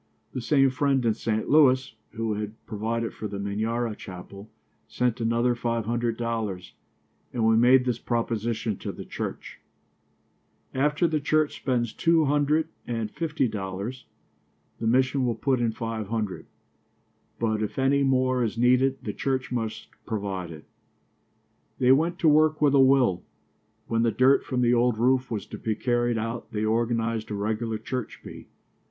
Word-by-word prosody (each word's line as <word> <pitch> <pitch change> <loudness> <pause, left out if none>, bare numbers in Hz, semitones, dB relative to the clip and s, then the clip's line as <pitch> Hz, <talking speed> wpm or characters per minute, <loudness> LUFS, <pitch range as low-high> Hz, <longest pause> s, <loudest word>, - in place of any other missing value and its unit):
The 130 - -3
same 135 +1 +3
friend 135 -1 +1
in 115 - +3
St. 110 0 -2
Louis, 135 -4 +4 0.2
who 115 -1 -2
had 105 +1 -4
provided 115 +1 -3
for 110 - -5
the 100 -1 -6
Minyara 110 +3 -2
chapel, 100 +2 -10 0.4
sent 125 -1 -1
another 115 +2 +2
five 115 -2 -2
hundred 115 0 -1
dollars, 110 -6 -3 0.6
and 120 -3 0
we 110 0 +5
made 125 +3 +5
this 120 -2 -1
proposition 115 -2 -2
to - - -4
the - - -9
church: - - -6 1.1
"After 150 +5 +2
the 155 -1 0
church 155 +1 +1
spends 120 -4 -1
two 165 -1 +3
hundred 145 +2 +1 0.2
and 115 -3 -3
fifty 155 -5 -1
dollars, 100 +4 -5 0.7
the 115 - -2
mission 130 +3 +2
will 120 -2 0
put 130 +3 0
in 115 -1 +1
five 110 -2 -4
hundred, 110 -3 -3 0.9
but 110 -2 0
if 105 - -3
any 135 +1 +3
more 130 -2 +2
is 115 -1 -2
needed 125 +2 +3
the 105 - -4
church 130 +1 -2
must 115 -3 -3 0.2
provide 100 -5 -3
it." 75 -2 -11 1.1
They 130 -1 +4
went 165 +6 +3
to 165 - +4
work 155 +1 +4
with 145 -2 +3
a 140 - +5
will. 130 -8 +4 0.6
When 115 0 0
the 115 - +3
dirt 130 +4 +4
from 125 -2 -2
the 120 0 +3
old 120 -1 +2
roof 130 +3 +2
was 105 -4 -3
to - - -9
be 110 -1 -1
carried 120 0 0
out 115 +1 -4
they 105 0 -1
organized 115 0 0
a 105 - -3
regular 110 +2 -2
church 120 +2 -5
bee. - - -10
120 Hz, 160 wpm, -26 LUFS, 110-130 Hz, 1.1 s, we